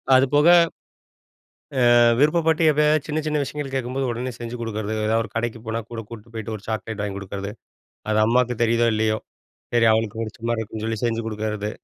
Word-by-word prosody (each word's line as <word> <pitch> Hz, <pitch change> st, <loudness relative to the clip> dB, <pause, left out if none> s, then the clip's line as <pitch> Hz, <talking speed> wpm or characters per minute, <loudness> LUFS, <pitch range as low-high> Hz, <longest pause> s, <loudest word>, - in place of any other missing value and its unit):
அதுபோக, 145 Hz, +4 st, +4 dB, 1.5 s
அ -, -, +7 dB, 0.2 s
விருப்பப்பட்டு 160 Hz, +2 st, +3 dB
எப்பயாச்சு 150 Hz, 0 st, +2 dB
சின்ன, 155 Hz, +1 st, 0 dB
சின்ன 150 Hz, -1 st, 0 dB
விஷயங்கள் 140 Hz, -1 st, -5 dB
கேட்கும்போது, 130 Hz, +1 st, -2 dB
உடனே 120 Hz, +2 st, -3 dB
செஞ்சு 120 Hz, 0 st, -6 dB
குடுக்குறது, 110 Hz, -2 st, -3 dB
ஏதாவது 110 Hz, +1 st, +2 dB
ஒரு 110 Hz, -, -10 dB
கடைக்கு 115 Hz, 0 st, -2 dB
போனா 110 Hz, +1 st, -2 dB
கூட 115 Hz, -1 st, -5 dB
கூட்டிட்டு 115 Hz, 0 st, -11 dB
போயிட்டு 110 Hz, 0 st, -4 dB
ஒரு 105 Hz, -, -14 dB
சாக்லேட் 110 Hz, -1 st, -4 dB
வாங்கி 100 Hz, -1 st, -3 dB
குடுக்குறது. 100 Hz, +1 st, -6 dB, 0.6 s
அது 110 Hz, -, +2 dB
அம்மாவுக்கு 125 Hz, +1 st, +2 dB
தெரியுதோ, 115 Hz, +1 st, +3 dB
இல்லையோ, 110 Hz, 0 st, +1 dB, 0.6 s
சரி 115 Hz, -1 st, +5 dB
அவளுக்கு 110 Hz, 0 st, -1 dB
புடிச்ச 110 Hz, +1 st, -7 dB
மாரி 115 Hz, -1 st, 0 dB
இருக்கும்ன்னு 110 Hz, 0 st, -6 dB
சொல்லி 115 Hz, -2 st, -2 dB
செஞ்சு 115 Hz, -1 st, -1 dB
குடுக்குறது. 105 Hz, -1 st, -3 dB
115 Hz, 170 wpm, -23 LUFS, 110-130 Hz, 1.5 s, அ